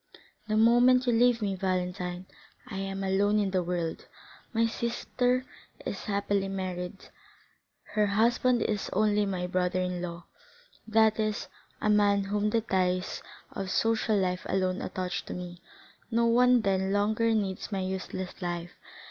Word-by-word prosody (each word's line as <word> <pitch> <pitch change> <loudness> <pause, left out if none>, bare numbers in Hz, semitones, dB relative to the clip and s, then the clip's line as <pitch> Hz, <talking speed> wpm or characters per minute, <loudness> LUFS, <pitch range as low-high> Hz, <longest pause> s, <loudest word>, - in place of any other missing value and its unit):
The 215 0 +1
moment 245 +3 +5
you 245 - +2
leave 235 -1 +3
me, 200 -1 0
Valentine, 180 -1 -2 0.4
I 210 -7 -6
am 195 0 -3
alone 200 +2 +2
in 200 -2 +1
the 185 -1 +1
world. 175 -2 -3 0.4
My 230 -1 +2
sister 245 +2 -1 0.4
is - - -4
happily 200 -1 0
married; 185 -1 -5 0.8
her 210 -1 +3
husband 235 +3 +2
is 210 -2 -2
only 210 0 +2
my 185 -2 -2
brother 180 0 0
in 180 -1 -2
law, 170 -1 -6 0.6
that 220 0 +3
is, 215 -1 -1 0.3
a 215 - 0
man 205 -1 +4
whom 205 +1 0
the 225 +1 +1
ties 185 -3 0 0.3
of 195 -1 -5
social 225 0 +1
life 180 -1 0
alone 185 -1 0
attach 185 -1 -3
to - - -6
me; 180 0 -7 0.5
no 235 0 +2
one 245 +1 +5
then 190 -2 0
longer 215 +3 +2
needs 195 -2 -2
my 195 -2 -1
useless 185 0 -5
life. 175 -1 -3
200 Hz, 150 wpm, -29 LUFS, 185-220 Hz, 0.8 s, moment